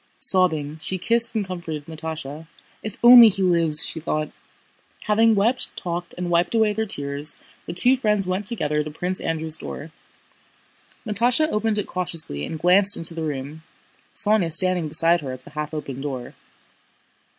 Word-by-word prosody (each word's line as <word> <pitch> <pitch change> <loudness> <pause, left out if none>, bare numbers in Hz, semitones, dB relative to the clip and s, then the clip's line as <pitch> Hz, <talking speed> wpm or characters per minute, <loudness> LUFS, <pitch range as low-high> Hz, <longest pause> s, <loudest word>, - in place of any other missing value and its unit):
Sobbing, 160 -5 +1
she 185 - -4
kissed 230 +4 +3
and 210 -2 -1
comforted 170 -5 -7
Natásha. 160 -1 -7 0.3
"If 215 -2 -8
only 240 -1 +9
he 195 -1 -3
lives!" 165 -4 +3
she 160 - -4
thought. 155 -1 -3 0.7
Having 220 +1 +2
wept, 230 +6 -1
talked, 175 0 -6
and 175 -1 -4
wiped 175 +5 0
away 220 -2 +2
their 220 +1 -3
tears, 140 -2 -2 0.3
the 170 - -5
two 245 +9 +5
friends 210 -6 0
went 185 +2 -3
together 150 -10 -1
to 155 - -7
Prince 180 +4 -4
Andrew's 160 -1 +3
door. 155 +3 -9 1.1
Natásha 240 +8 +1
opened 215 0 -1
it 205 - -2
cautiously 165 - -4
and 160 - -6
glanced 190 +4 +3
into 165 0 0
the 165 - -6
room, 150 0 -6 0.5
Sónya 205 -5 +1
standing 180 0 +2
beside 165 +2 +2
her 135 -3 -6
at 130 0 -11
the - - -15
half 150 0 -6
open 140 -4 -7
door. 130 -4 -6
170 Hz, 160 wpm, -22 LUFS, 155-205 Hz, 1.1 s, only